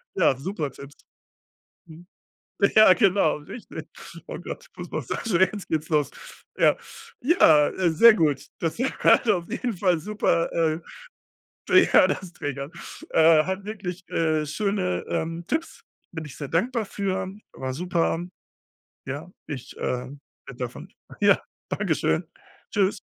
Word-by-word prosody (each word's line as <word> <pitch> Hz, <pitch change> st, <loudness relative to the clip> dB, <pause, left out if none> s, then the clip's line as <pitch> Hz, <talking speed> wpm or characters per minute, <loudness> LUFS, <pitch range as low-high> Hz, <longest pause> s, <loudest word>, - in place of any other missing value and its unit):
Ja, 165 Hz, -7 st, +3 dB
super 155 Hz, 0 st, -3 dB
Tipps. 140 Hz, +2 st, -12 dB, 0.9 s
Mhm. 170 Hz, +2 st, -14 dB, 0.7 s
Ja, 215 Hz, -3 st, +9 dB
genau, 195 Hz, -5 st, +3 dB
richtig. 155 Hz, +10 st, -9 dB, 0.4 s
Oh -, -, -6 dB
Gott, -, -, -8 dB
Fußmassage, 205 Hz, -7 st, -3 dB
jetzt 205 Hz, -3 st, -7 dB
geht's 155 Hz, -1 st, -2 dB
los. 150 Hz, -3 st, +2 dB, 0.5 s
Ja, -, -, +4 dB, 0.4 s
ja, 160 Hz, -, +5 dB
äh, 185 Hz, -2 st, 0 dB
sehr 230 Hz, +9 st, +8 dB
gut, 155 Hz, -9 st, +1 dB
das 165 Hz, +3 st, -2 dB
hat 255 Hz, -2 st, +3 dB
auf 175 Hz, -5 st, +1 dB
jeden 240 Hz, -4 st, -2 dB
Fall 180 Hz, -4 st, +2 dB
super, 205 Hz, -3 st, 0 dB
äh 160 Hz, -1 st, +1 dB, 1.1 s
ja, -, -, +7 dB
das 185 Hz, -3 st, -3 dB
Triggern. 140 Hz, -2 st, -5 dB, 0.4 s
Äh, 160 Hz, -1 st, +5 dB
hat 190 Hz, +1 st, -3 dB
wirklich 190 Hz, -4 st, -6 dB
äh, 155 Hz, -2 st, +1 dB
schöne, 190 Hz, +3 st, -1 dB
ähm, 165 Hz, +1 st, -3 dB
Tipps, 330 Hz, -, -3 dB, 0.3 s
bin 160 Hz, -2 st, -5 dB
ich 145 Hz, -, -10 dB
sehr 145 Hz, -, -6 dB
dankbar 225 Hz, -, 0 dB
für, 190 Hz, -1 st, -2 dB, 0.2 s
war 130 Hz, 0 st, -4 dB
super. 170 Hz, 0 st, 0 dB, 0.9 s
Ja, 145 Hz, +6 st, -6 dB, 0.2 s
ich, 135 Hz, -5 st, -7 dB
ähm, 130 Hz, +3 st, -4 dB, 0.3 s
bin -, -, -10 dB
davon -, -, -6 dB, 0.3 s
Ja, -, -, +4 dB, 0.3 s
dankeschön, -, -, 0 dB, 0.5 s
tschüss. 200 Hz, -2 st, +1 dB
170 Hz, 130 wpm, -25 LUFS, 155-200 Hz, 1.1 s, Ja